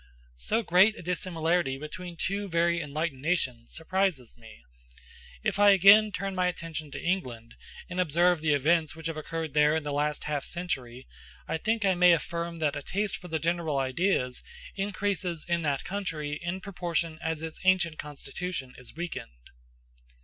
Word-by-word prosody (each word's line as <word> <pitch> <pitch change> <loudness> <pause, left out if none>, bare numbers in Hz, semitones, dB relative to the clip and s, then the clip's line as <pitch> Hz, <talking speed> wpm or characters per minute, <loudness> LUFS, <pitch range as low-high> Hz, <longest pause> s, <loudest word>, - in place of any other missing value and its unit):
So 225 - 0
great 195 +4 +5
a - - -9
dissimilarity 170 -4 0
between 170 +4 -8
two 200 +3 -2
very 170 0 +2
enlightened 150 -2 -3
nations 130 -8 -1
surprises 165 - -1
me. 110 - -15 0.8
If - - 0
I 205 0 +7
again 200 +3 +7
turn 195 0 -3
my 180 -1 +1
attention 165 -3 -5
to - - -6
England, 125 -11 -2 0.3
and 180 0 -4
observe 175 0 +3
the 155 -2 +3
events 155 +2 +2
which 160 0 -11
have 165 -1 -2
occurred 160 0 -4
there 150 0 +4
in 160 - -1
the 145 -1 -3
last 150 +1 0
half 150 -2 -2
century, 130 -8 -4 0.4
I 160 - -1
think 220 +1 0
I 190 - +4
may 180 0 +6
affirm 170 +1 -2
that 150 -2 0
a 145 - -4
taste 200 +7 -2
for 180 - -11
general 165 -2 0
ideas 130 -1 0 0.3
increases 195 -4 -2
in 170 -1 +1
that 145 -4 -1
country 165 -7 -3
in 175 +2 -3
proportion 170 -4 -2
as 160 -1 -2
its 160 -1 -6
ancient 185 -4 +2
constitution 145 -1 -6
is 125 +1 -11
weakened. - - -7
165 Hz, 165 wpm, -28 LUFS, 150-180 Hz, 0.8 s, I